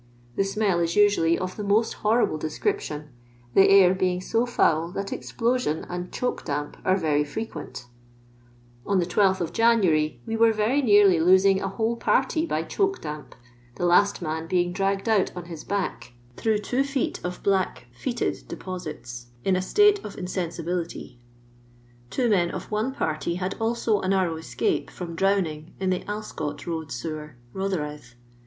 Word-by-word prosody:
The - - +2
smell 195 -2 0
is 170 0 0
usually 200 -5 +4
of 185 0 -4
Uie 210 - -4
most 215 +3 +2
horrible 215 -7 +2
description, 155 - -3 0.4
the 195 - +6
air 195 -2 +7
being 185 -1 0
so 225 +6 0
foul 165 -7 +2
that 200 0 -3
explosion 235 -9 -1
and 180 0 -5
choke 250 - -2
damp 145 -1 -3
are 190 +1 +2
Tory 150 -3 +2
frequent 145 - -6 1.0
On 200 - +1
the 175 - +2
12th 190 -2 +1
January 180 - +3
we 225 - -2
were 225 0 +4
very 220 +7 +1
nearly 205 -7 +5
losing 190 +3 +5
a - - -1
whole 220 +4 -1
party 275 +7 +1
by 155 - -1
choke 390 - 0
damp, 150 -4 -7 0.4
the 175 - 0
fast 190 +2 +3
man 160 0 -3
being 175 0 +1
dragged 195 +2 -1
out 215 -4 +2
on 175 - -6
his 165 -3 -8
back 190 -10 -3 0.2
(through 220 -1 +1
two 245 +6 0
feet 275 -2 -2
of 180 0 -5
bbuk 190 -9 +1
foetid 240 - -2
deposito) 155 -10 -7 0.2
in 190 - +3
a 185 - +1
state 415 - +4
of 205 - -8
insensibility..... 170 -6 -4 0.9
Two 250 - 0
men 180 -6 +3
of - - -7
one 215 +5 0
party 160 - -2
had 185 +1 -2
also 225 -2 +1
a - - -3
narrow 185 -4 +1
escape 120 -7 -1
from 175 -2 -7
drowning 165 -4 0
in 190 -1 0
the 180 - +1
Alscot 160 -9 -5
road 160 -3 -4
sewer, 150 +2 -5 0.2
Rotherhithe. 150 -10 -4
185 Hz, 160 wpm, -25 LUFS, 160-210 Hz, 1.0 s, air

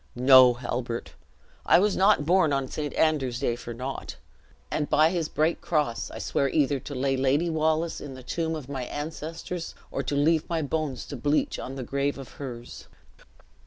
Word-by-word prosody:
No, 130 0 +7
Halbert! 120 -1 -4 0.5
I - - +6
was 200 +3 +2
not 195 -5 +4
born 175 -2 +4
on 135 -1 0
St. 150 +1 -4
Andrew's 140 -6 +1
day 120 -4 0
for 120 0 -8
naught; 130 +3 -5 0.6
and 150 -1 -1
by 155 +2 +4
his 170 -4 -1
bright 155 +3 0
cross 150 -8 -1
I - - -8
swear 140 - 0
either 145 -1 +1
to 140 +3 -8
lay 135 +1 +1
Lady 140 +6 +1
Wallace 160 +1 0
in 140 -2 -7
the 130 - -11
tomb 160 +4 -2
of 150 -5 -7
my 135 -3 -4
ancestors, 160 +4 -5 0.2
or - - -2
leave 150 +3 +2
my 165 -2 0
bones 145 -4 -2
to 145 - -7
bleach 145 +4 0
on 130 - -6
the 135 - -5
grave 140 +3 -1
of 135 -2 -9
hers." 120 -3 -8
145 Hz, 180 wpm, -26 LUFS, 130-160 Hz, 0.6 s, No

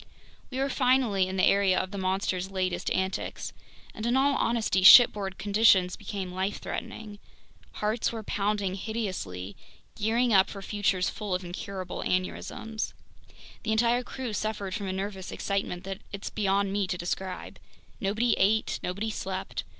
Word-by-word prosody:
We 260 - -6
were 270 +1 +1
finally 250 -8 +2
in 190 +1 -4
the 185 - +2
area 195 -2 +4
of 185 - -3
the 200 - -5
monster's 190 0 -1
latest 185 -2 -1
antics! 190 0 -2 0.4
And 215 - -7
in 245 +2 +3
all 280 +1 +4
honesty, 230 -5 +1
shipboard 195 -2 +8
conditions 200 -3 +4
became 195 -3 -5
life 190 +2 -2
threatening. 210 -2 -6 0.5
Hearts 215 +2 -1
were 225 -2 -5
pounding 205 -2 -1
hideously, 185 - -4 0.4
gearing 230 +3 +1
up 190 -1 +5
for 195 -1 -8
futures 195 -2 0
full 205 -4 -3
of 180 0 -4
incurable 185 +1 -5
aneurysms. 215 +4 -2 0.7
The 220 - -1
entire 235 +2 +3
crew 250 -2 -5
suffered 205 -3 -3
from 200 -2 -3
a - - -1
nervous 190 0 -4
excitement 195 -2 -2
that 195 +1 -5
it's 200 -1 -6
beyond 200 -1 +1
me 200 -1 0
to 180 - -2
describe. 180 +1 -4 0.4
Nobody 220 +3 +1
ate, 215 +3 +2
nobody 200 +5 -3
slept. 190 -2 -4
200 Hz, 150 wpm, -28 LUFS, 190-220 Hz, 0.7 s, shipboard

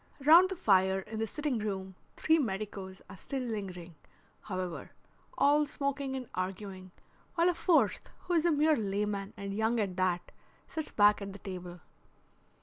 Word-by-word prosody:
Round 340 +5 +8
the 380 - -3
fire 190 - +3
in 220 +3 -7
the 225 - -1
sitting 295 -2 -2
room 190 -3 -4 0.2
three 320 +1 +3
medicos 195 -5 -4
are 190 - -11
still 265 +7 -3
lingering, 190 -7 -5 0.5
however, 185 -3 -5 0.4
all 295 +1 +4
smoking 280 -1 -2
and 255 -2 -5
arguing, 185 0 -5 0.5
while 340 0 +4
a - - +2
fourth, 345 -1 +2
who 355 - -3
is 330 -2 +3
a 340 - +3
mere 305 +1 +4
layman 200 -2 -2
and 200 -1 -5
young 220 +3 +1
at 195 -4 -1
that, 180 -1 0 0.4
sits 315 -1 -5
back 205 0 +4
at 200 -1 -6
the - - -9
table. 180 -3 -8
210 Hz, 160 wpm, -31 LUFS, 190-280 Hz, 0.5 s, Round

